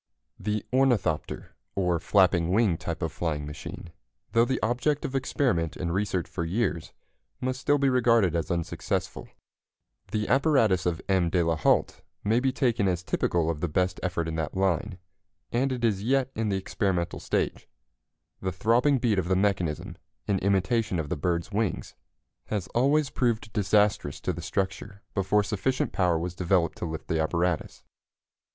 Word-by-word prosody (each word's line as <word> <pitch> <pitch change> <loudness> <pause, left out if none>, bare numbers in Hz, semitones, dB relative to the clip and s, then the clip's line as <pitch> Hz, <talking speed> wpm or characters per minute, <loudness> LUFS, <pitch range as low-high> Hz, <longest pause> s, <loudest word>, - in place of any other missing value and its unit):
The 105 -1 -2
ornithopter, 125 - +1 0.2
or 90 -3 +1
flapping 90 -1 +3
wing 105 -3 +3
type 80 0 -4
of 80 - -1
flying 80 -2 -2
machine, 75 +3 -8 0.4
though 115 +1 +4
the 130 +1 -1
object 125 +6 0
of 130 - -4
experiment 125 - 0
and 85 -2 -2
research 95 -2 -1
for 85 - -4
years, 85 -2 -1 0.5
must 130 0 -2
still 145 0 +3
be 140 -1 +2
regarded 115 -8 +3
as 85 - -1
unsuccessful. 85 -2 -3 0.8
The 105 -1 -1
apparatus 125 - +3
of 85 -2 -2
M. 95 -3 +2
de 90 0 +2
la 85 0 +1
Hault 75 - +1 0.2
may 110 +3 +3
be 130 +1 +1
taken 120 -6 +1
as 90 -1 0
typical 85 -2 0
of 80 - -5
the 90 - +1
best 90 +3 0
effort 85 -3 -1
in 80 - -3
that 80 +3 -3
line, 95 +1 0 0.5
and 130 +3 +1
it 125 -2 -3
is 100 -4 +1
yet 135 +3 +1
in 110 -1 -1
the 100 - +1
experimental 95 -2 -1
stage. - - -2 0.7
The 95 - -1
throbbing 115 - +3
beat 115 -5 +1
of 90 - -2
the 95 - +2
mechanism, 90 -5 -1 0.3
in 100 -2 +1
imitation 100 +2 +1
of 80 -3 -3
the 90 - -1
bird's 85 +5 -1
wings, 105 -3 -2 0.5
has 105 -4 -2
always 140 +4 +2
proved 115 -3 -1
disastrous 105 - +2
to 90 - -1
the 85 - -6
structure 100 +3 -3
before 105 +1 +2
sufficient 110 +6 -1
power 90 -3 +2
was 85 +2 -3
developed 90 -1 +1
to - - -2
lift 80 -1 -6
the 80 -1 +1
apparatus. 85 +1 -1
95 Hz, 165 wpm, -27 LUFS, 85-115 Hz, 0.8 s, though